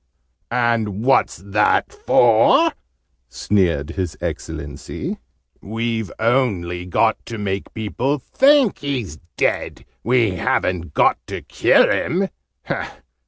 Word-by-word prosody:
"And 115 -4 0
what's 135 +2 +2
that 100 +4 +1
for?" 120 - +4 0.6
sneered 85 +1 0
His 90 -2 -4
Excellency. 70 0 -5 0.4
"We've 115 0 -3
only 100 -8 0
got 90 - +1
to 115 - -5
make 100 -2 -3
people 120 +6 -1
think 270 - +3
he's 125 - -4 0.2
dead! - - -1 0.2
We 120 -3 +2
haven't 85 -3 -1
got - - +3
to - - -6
kill - - +3
him! 190 +3 0
110 Hz, 100 wpm, -20 LUFS, 90-125 Hz, 0.6 s, for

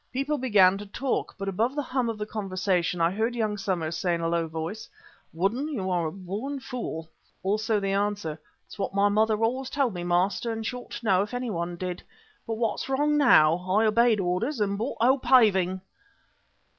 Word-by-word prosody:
People 275 +3 -1
began 200 -6 +4
to 205 - -7
talk, 260 +6 -2
but 195 -1 -5
above 225 +8 0
the 290 - -1
hum 255 -2 -1
of 225 - -3
the 210 - -3
conversation 185 -4 -1
I 165 +1 +3
heard 225 +5 -1
young 215 -3 0
Somers 175 -5 -2
say 175 0 0
in 170 - -4
a 165 - 0
low 165 0 0
voice: 165 +7 -5 0.4
"Woodden, 220 - -1
you're 185 - -1
a - - -4
born 200 - -5
fool." 235 -12 -5 0.4
Also 215 +2 +1
the 195 -1 -1
answer: 200 -6 -1 0.3
"That's - - -14
what 195 0 -3
my 200 +1 +4
mother 215 +1 +2
always 255 +3 0
told 275 -6 0
me, 175 -1 -5
master, 180 +6 +1
and 225 0 -4
she 250 - -2
ought 250 - -9
to 235 - -7
know 190 -3 +4
if 210 +5 -4
anyone 175 -9 -3
did. 180 0 -5 0.5
But 225 - -2
what's 230 +3 -2
wrong 295 +3 +2
now? 165 - +6
I 210 +4 +3
obeyed 225 0 +4
orders 195 +10 -1
and 200 -1 0
bought 230 +7 -3
'O. 260 +4 +4
Paving. 190 -8 +4
205 Hz, 195 wpm, -26 LUFS, 185-240 Hz, 0.5 s, now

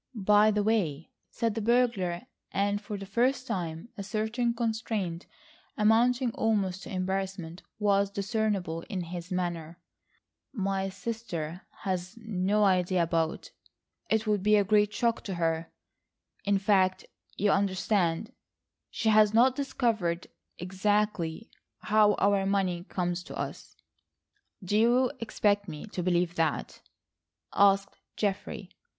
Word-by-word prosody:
"By 210 0 +5
the 210 -1 +1
way," 175 -9 0 0.2
said 230 -2 -1
the 225 - -3
burglar, 220 -7 +1 0.3
and 205 +1 0
for 210 0 -5
the 195 - -7
first 250 +6 +1
time 170 -2 -4
a - - -6
certain 220 +4 -1
constraint, 220 -7 -2 0.5
amounting 235 +3 +3
almost 200 -5 0
to - - -9
embarrassment, 185 -2 -3 0.2
was 200 -1 +2
discernible 200 -4 -1
in 190 -3 -2
his 175 +1 -7
manner, 175 -2 -3 0.8
"my 195 -3 -1
sister 190 -6 -5 0.2
has 185 0 -3
no 210 -2 0
idea 185 -2 +3
about—it 165 +6 -3
would 210 -2 +1
be 210 +2 +4
a 205 - +4
great 210 +1 +3
shock 230 +1 0
to 195 - -3
her—in 165 +4 -4
fact, 190 -2 +2 0.3
you 205 0 +2
understand, 195 +1 0 0.6
she 220 - 0
has 215 0 +5
not 250 +3 +5
discovered 225 -11 -1 0.3
exactly 195 0 -1 0.3
how 210 -1 +4
our 200 -1 +2
money 185 -3 0
comes 175 -2 -2
to - - -8
us." - - -6 0.9
"Do 205 +4 +1
you 245 +3 +4
expect 205 -2 +1
me 155 -3 -7
to 185 - -4
believe 175 -1 +1
that?" 160 -2 -1 0.7
asked 195 0 +3 0.2
Geoffrey. 205 -1 -3
200 Hz, 120 wpm, -29 LUFS, 180-220 Hz, 0.9 s, By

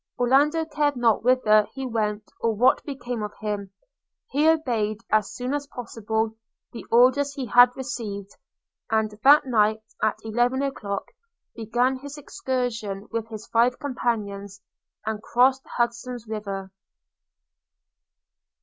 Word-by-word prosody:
Orlando 290 +6 +3
cared 295 -2 0
not 230 -4 +2
whither 220 -4 +4
he 270 -1 -4
went 215 -3 -1 0.2
or 230 -1 0
what 250 +5 +3
became 245 -5 -5
of 210 -1 -5
him 205 -2 -4 0.3
– - - -47
he 295 +4 +4
obeyed, 235 -10 +1
as 215 -2 +2
soon 250 +2 -3
as 290 -1 -2
possible, 225 -3 -3 0.4
the 235 - -7
orders 265 +4 +4
he 270 - -3
had 245 +2 +7
received; 215 -7 -5 0.6
and 220 -1 +1
that 290 +2 +7
night, 220 -3 +2 0.2
at 215 0 +1
eleven 240 +4 +1
o'clock, 205 -8 -3 0.5
began 240 +4 0
his 285 +2 -9
excursion 240 -8 -3
with 225 -1 -3
his 220 -1 -8
five 240 +2 +3
companions, 205 -7 -3 0.5
and 215 -1 -3
crossed 260 +4 +3
Hudson's 235 0 -2
River. 200 -3 -5
235 Hz, 130 wpm, -25 LUFS, 215-260 Hz, 0.6 s, had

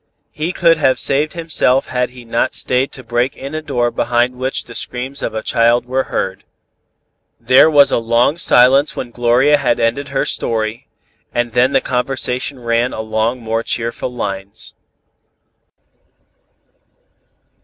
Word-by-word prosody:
He 155 +4 -3
could 170 -2 +3
have 130 -4 +2
saved 145 +3 +2
himself 160 -6 +1
had 125 -1 -2
he 125 -1 -13
not 115 +1 -1
stayed 130 +2 0
to 130 - -10
break 120 +2 -1
in 135 +2 -7
a 155 - -3
door 125 -6 -1
behind 120 +1 0
which 130 +1 -2
the 120 - -12
screams 130 +4 -4
of - - -2
the 110 - -4
child 120 +1 +2
were 130 +1 -1
heard." 95 0 -3 1.0
There 130 +6 +5
was 145 -3 +5
a - - +2
long 115 +7 +1
silence 135 +3 +4
when 120 - -6
Gloria 125 +5 +3
had 125 -4 0
ended 120 +5 0
her 135 -1 -1
story, 110 0 -2 0.5
and 120 0 0
then 125 +3 +2
the - - +3
conversation 130 +1 -2
ran 115 +1 0
along 110 +3 -2
more 115 0 -2
cheerful 115 +1 -3
lines. 100 -4 -6
125 Hz, 145 wpm, -17 LUFS, 115-135 Hz, 1.0 s, There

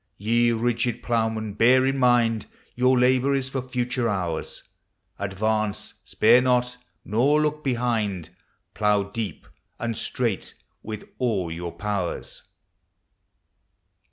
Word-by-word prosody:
Ye 120 +3 +2
rigid 120 +1 -1
Ploughmen! 110 -2 -1
bear 125 +5 +5
in 135 0 0
mind 120 -3 +3 0.3
Your 125 +1 +3
labor 130 +2 +3
is 135 -1 -1
for 135 -1 -2
future 125 -1 -1
hours. 90 -6 -3 0.6
Advance! 105 +1 -1
spare 115 +3 +4
not! 125 -1 +1 0.3
nor 135 +8 +3
look 150 0 -1
behind! 110 - -1 0.4
Plough 105 -1 +1
deep 110 -8 -5 0.3
and 115 -1 -3
straight 115 -2 -2 0.3
with 110 -1 -7
all 100 -9 0
your 85 +1 -5
pow 95 +1 -2
ers! - - -11
115 Hz, 115 wpm, -24 LUFS, 105-125 Hz, 0.6 s, bear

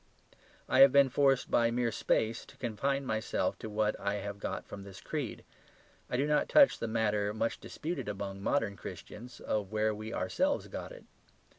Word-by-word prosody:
I 130 - +2
have 135 0 +10
been 140 0 +6
forced 135 0 +2
by 115 -1 +4
mere 120 0 0
space 110 +1 0
to - - -16
confine 135 +4 -1
myself 110 -2 -1
to 110 - -6
what 105 0 +1
I 100 +1 -1
have 100 0 -5
got - - -4
from 100 - -8
this 95 -1 -10
creed; - - -4 0.6
I 125 - 0
do 135 - +2
not 150 0 +1
touch 290 -2 +6
the 115 - -2
matter 105 -2 0
much 115 +1 -1
disputed 160 -7 -5
among 100 -1 -5
modern 110 -3 0
Christians, 120 +4 -9
of 105 -2 -2
where 110 0 +1
we 110 +1 -6
ourselves 285 - 0
got - - -6
it. - - -12
110 Hz, 180 wpm, -32 LUFS, 105-135 Hz, 0.6 s, have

